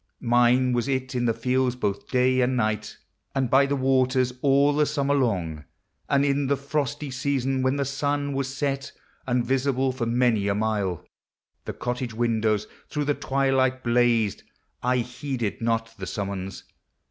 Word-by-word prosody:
Mine 125 +1 +3
was 120 +1 0
it 130 -1 -2
in 125 -1 0
the 115 - +3
fields 125 +2 +1
both 100 -5 -2
day 130 0 +3
and 125 +1 +1
night, 110 -2 -1 0.4
And 130 -3 0
by 140 +1 +5
the 140 - 0
waters, 130 -1 +2
all 140 +1 +4
the 150 0 +2
Summer 140 -1 0
long; 90 - -1 0.4
And 140 0 +3
in 140 0 +1
the 140 +1 +1
frosty 145 0 -3
season, 135 0 -1
when 130 +1 +1
the 140 -1 0
sun 145 +1 -1
Was 135 -1 -2
set, 140 0 -3 0.3
and, 125 -1 +1
visible 135 0 +1
for 125 -2 -3
many 115 -4 +2
a 100 - +1
mile. 105 -5 -1 0.6
The - - -4
cottage 125 -2 -4
windows 110 -3 +1 0.2
through 150 -1 -2
the 145 - +2
twilight 135 -2 +1
blazed, 120 -3 +2 0.4
I 125 +1 +1
heeded 125 -2 -3
not 115 0 -1
the 95 - -5
summons. 95 -1 -4
130 Hz, 160 wpm, -25 LUFS, 115-135 Hz, 0.6 s, by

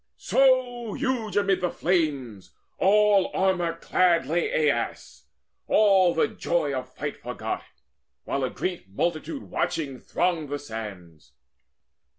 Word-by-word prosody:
So 250 -4 +2
huge 255 -7 -2
amid 195 -2 +2
the 180 - +1
flames, 145 - -1 0.2
all 205 0 +4
armour 180 -3 +1
clad, 170 -2 +2
Lay 155 -1 +1
Aias, 120 -3 -5 0.4
all 195 -4 +4
the 165 - +3
joy 160 -5 -1
of 130 -1 -4
fight 145 +1 -6
forgot, 125 -1 -4 0.6
While 140 - -2
a 130 - 0
great 180 - -4
multitude 170 - -2
watching 140 -5 -2
thronged 170 -5 -1
the 145 - -2
sands. 105 - -9
170 Hz, 120 wpm, -26 LUFS, 135-195 Hz, 0.6 s, all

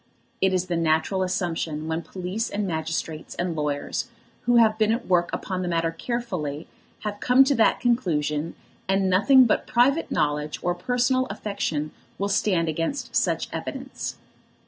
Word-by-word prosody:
It 190 - +4
is 185 -1 +1
the 175 -2 -1
natural 165 +4 +1
assumption 165 -4 -2
when 160 +1 -1
the 160 - -21
police 190 +4 -3
and 205 0 -2
magistrates 160 -2 -3
and 175 -1 -2
lawyers, 150 -2 -2 0.4
who 245 - +4
have 220 -2 +5
been 215 0 +3
at 235 +2 -1
work 175 -2 +2
upon 185 -1 -3
the 180 - -2
matter 165 -1 0
carefully, 165 - -4 0.3
have 205 -1 -4
come 250 +2 +6
to 275 +1 +2
that 225 -4 +3
conclusion, 165 - 0 0.3
and 195 0 +2
nothing 255 +8 +6
but 230 - +1
private 255 +6 +3
knowledge 150 0 0
or 175 - +1
personal 250 +7 +1
affection 200 -7 -3 0.3
will 200 +1 -1
stand 185 -4 +1
against 165 - -3
such - - +1
evidence. - - -5
185 Hz, 160 wpm, -25 LUFS, 160-220 Hz, 0.4 s, come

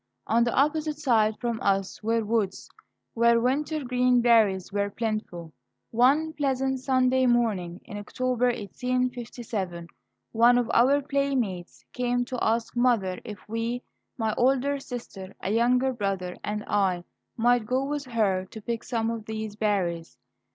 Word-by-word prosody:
On 235 +1 +3
the 235 - 0
opposite 300 +2 +1
side 220 -7 +2
from 235 -2 -2
us 195 -1 0
were 225 +1 0
woods, 210 -3 -1 0.5
where 235 0 +4
wintergreen 250 -1 +1
berries 220 -6 +3
were 205 0 0
plentiful. 200 -7 -4 0.4
One 280 +7 +3
pleasant 265 -3 0
Sunday 260 -1 +2
morning 205 -8 0
in 205 - -7
October, 250 +4 -1
1857, 240 -5 -3 0.5
one 235 +2 +5
of 245 -2 0
our 275 +4 +4
playmates 265 -11 -2
came 245 0 0
to 255 -1 -4
ask 230 +2 0
mother 230 -7 +2
if 210 -4 -10
we, 230 +3 -3 0.3
my 220 -3 0
older 270 +3 +2
sister, 215 -7 -8
a 190 - -3
younger 250 +3 +2
brother, 195 -5 -3
and 210 0 -3
I, 190 -4 +1 0.3
might 240 -1 +3
go 260 +3 0
with 290 0 -3
her 210 -6 0
to 220 - -10
pick 230 +1 -4
some 230 -2 -1
of 225 -2 -5
these 220 -1 -5
berries. 180 - -1
235 Hz, 140 wpm, -26 LUFS, 205-255 Hz, 0.5 s, one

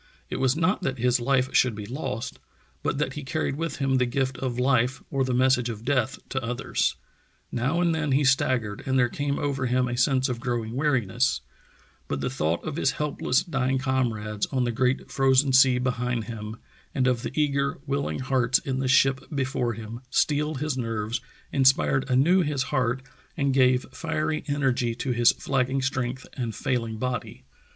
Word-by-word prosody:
It - - -2
was 130 0 +2
not 185 +4 +1
that 135 -1 -2
his 125 +1 +2
life 130 +1 +1
should 125 -4 +3
be 105 -1 -6
lost, 120 -1 -5 0.4
but - - -1
that 135 -2 -1
he 150 - -6
carried 140 0 -2
with 165 +2 -3
him 135 -2 +1
the 125 -1 +2
gift 130 +1 -1
of 125 -2 -3
life 125 0 +1
or 135 -1 +1
the 130 - -1
message 125 -1 +3
of 110 0 -7
death 130 -2 +1
to 130 -1 -2
others. 120 +1 -1 0.6
Now 135 +8 0
and 170 -2 +2
then 155 -3 -1
he 140 +2 +3
staggered 130 -6 +1
and 130 0 +2
there 125 -1 +3
came 140 +2 -2
over 140 -3 -1
him 125 +1 +1
a 120 - -2
sense 130 +1 +2
of 125 -3 -3
growing 120 -2 -2
weariness, 130 -3 +1 0.7
but 70 - -2
the 125 - -2
thought 85 -10 -1
of 155 -1 -4
his 135 - +1
helpless, 145 -3 0
dying 135 -4 0
comrades 115 -6 -1
on 130 -2 0
the 120 - 0
Great 125 +3 0
Frozen 135 0 +3
Sea 130 -1 +6
be 125 0 +1
hind 125 -1 -2
him, 110 0 -7 0.4
and 130 -3 +2
of 125 -2 +2
the 145 - -4
eager, 140 -1 +1
willing 140 0 -1
hearts 125 -1 +2
in 130 -1 -3
the 135 - -1
ship 135 +1 +4
before 130 -5 -1
him, 115 +2 -8
steeled 150 0 +1
his 150 -3 -1
nerves, 115 0 -2 0.3
inspired 135 0 +3
anew 150 +9 +4
his 145 -5 0
heart, 130 -1 -1 0.3
and 140 -3 +1
gave 130 -1 +4
fiery 155 +1 -2
energy 130 -5 0
to 125 +2 -2
his 120 -1 +5
flagging 135 0 0
strength 130 -1 -2
and 115 -5 -4
fail 120 +1 -1
ing 110 -1 -6
body. 125 +2 -4
130 Hz, 190 wpm, -26 LUFS, 120-140 Hz, 0.7 s, Sea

